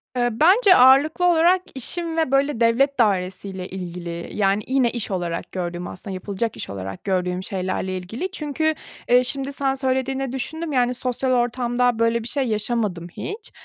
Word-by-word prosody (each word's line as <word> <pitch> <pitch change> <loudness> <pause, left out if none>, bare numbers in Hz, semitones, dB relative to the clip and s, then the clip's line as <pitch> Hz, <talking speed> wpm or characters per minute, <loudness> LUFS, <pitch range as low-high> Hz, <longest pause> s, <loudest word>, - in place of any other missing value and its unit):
Iıı, 240 -1 +2
bence 380 +4 +6
ağırlıklı 280 +7 +5
olarak 350 +2 +4
işim 330 +5 -3
ve 320 -5 +1
böyle 275 -2 +2
devlet 255 +4 +2
dairesiyle 190 -2 0
ilgili. 175 -2 -6
Yani, 200 0 +1
yine 260 -2 +2
iş 235 -4 -4
olarak 175 -2 -3
gördüğüm, 175 -1 -4
aslında 190 +1 -7
yapılacak 200 +4 -3
iş - - -6
olarak 95 -1 -6
gördüğüm 180 -1 -1
şeylerle 185 -1 -3
ilgili, 230 - -5
çünkü, 315 -1 -1 0.4
ııı, 250 0 +6
şimdi 275 +2 -1
sen 270 -1 0
söylediğinde 265 0 -1
düşündüm, 315 +5 -4
yani 250 -2 +2
sosyal 255 +1 -1
ortamda 245 -1 +1
böyle 230 0 +2
bir - - -6
şey 275 +2 -1
yaşamadım 215 -5 -1
hiç. 420 +3 -6
240 Hz, 160 wpm, -22 LUFS, 190-275 Hz, 0.4 s, bence